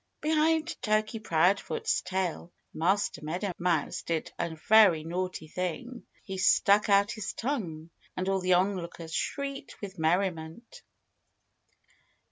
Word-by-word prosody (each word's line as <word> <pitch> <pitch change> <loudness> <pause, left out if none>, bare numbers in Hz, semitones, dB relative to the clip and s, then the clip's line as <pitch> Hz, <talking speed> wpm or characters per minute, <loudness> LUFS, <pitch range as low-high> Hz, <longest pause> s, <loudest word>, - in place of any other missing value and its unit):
Behind 315 +1 +1
Turkey 215 0 0
Proudfoot's 200 - +1
tail 185 -2 -3 0.2
Master 185 +2 0
Meadow 180 +6 -2
Mouse 170 -4 0
did 165 -2 -3
a 170 -1 -2
very 205 -8 +6
naughty 175 -1 -4
thing. 185 +10 -5 0.2
He 190 -2 -6
stuck 200 +2 +4
out 200 +1 +4
his 215 -1 -5
tongue. 170 - -4 0.3
And 185 - -2
all 195 0 +1
the 185 0 +2
onlookers 175 -3 -1
shrieked 275 - -4
with 195 -4 -8
merriment. 165 +4 -1
190 Hz, 115 wpm, -29 LUFS, 170-215 Hz, 0.3 s, very